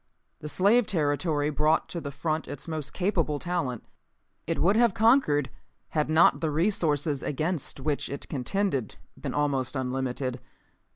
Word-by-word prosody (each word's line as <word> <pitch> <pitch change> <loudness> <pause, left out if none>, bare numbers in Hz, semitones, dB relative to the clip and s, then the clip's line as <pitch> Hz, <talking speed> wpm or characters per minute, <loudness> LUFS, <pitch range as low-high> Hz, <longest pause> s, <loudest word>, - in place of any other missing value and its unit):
"The 150 - -6
slave 210 +8 +3
territory 150 -2 0
brought 155 +2 +2
to 170 - -4
the 140 - -5
front 155 +2 -2
its 145 - -7
most 155 -3 -4
capable 175 -6 0
talent. 165 -8 -2 0.6
It - - -1
would 195 +5 +3
have 230 -3 +3
conquered 220 - +3 0.4
had 150 -1 0
not 160 +2 +4
the 160 - 0
resources 150 -4 +1
against 155 +1 -2
which 145 +1 -2
it 140 - -5
contended 140 - -1 0.2
been - - -5
almost 140 -3 0
unlimited. 130 -1 -2
150 Hz, 140 wpm, -27 LUFS, 140-175 Hz, 0.6 s, not